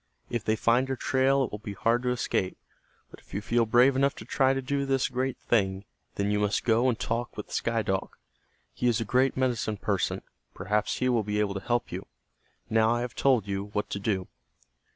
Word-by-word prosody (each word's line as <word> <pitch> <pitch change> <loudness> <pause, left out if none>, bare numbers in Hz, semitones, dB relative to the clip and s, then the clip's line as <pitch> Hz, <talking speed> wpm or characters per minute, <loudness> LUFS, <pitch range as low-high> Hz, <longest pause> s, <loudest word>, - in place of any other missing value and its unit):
If 120 -3 -1
they 110 -1 +1
find 120 +4 +2
your 135 -1 -2
trail 135 +2 +2
it - - -3
will 105 - -5
be 105 -1 -6
hard 115 +4 +2
to 125 - -1
escape. 115 -6 -1 0.5
But - - -13
if - - -13
you - - 0
feel 115 +2 +1
brave 125 +4 +5
enough 140 +1 +2
to - - -10
try 135 -1 +2
to 135 - 0
do 140 +2 -1
this 135 -1 +1
great 130 0 -2
thing, 95 -3 0 0.3
then 100 +1 0
you 105 - +1
must 105 0 +1
go 120 +2 +3
and 115 - 0
talk 120 +1 -3
with - - -7
Sky - - 0
Dog. - - -1 0.6
He 125 - -1
is 120 -2 +2
a 115 - -2
great 130 +5 +2
medicine 120 -5 0
person, - - -1 0.3
perhaps 105 +2 -1
he 130 - 0
will 120 -3 +3
be 105 0 -2
able 105 -2 +1
to 100 - -3
help 120 +3 -1
you. - - -6 0.6
Now 110 0 +3
I 120 - -1
have 125 -1 -4
told 125 -7 +2
you 100 0 -2
what 105 - -2
to 100 - -2
do." 95 -3 -1
120 Hz, 220 wpm, -28 LUFS, 105-130 Hz, 0.6 s, brave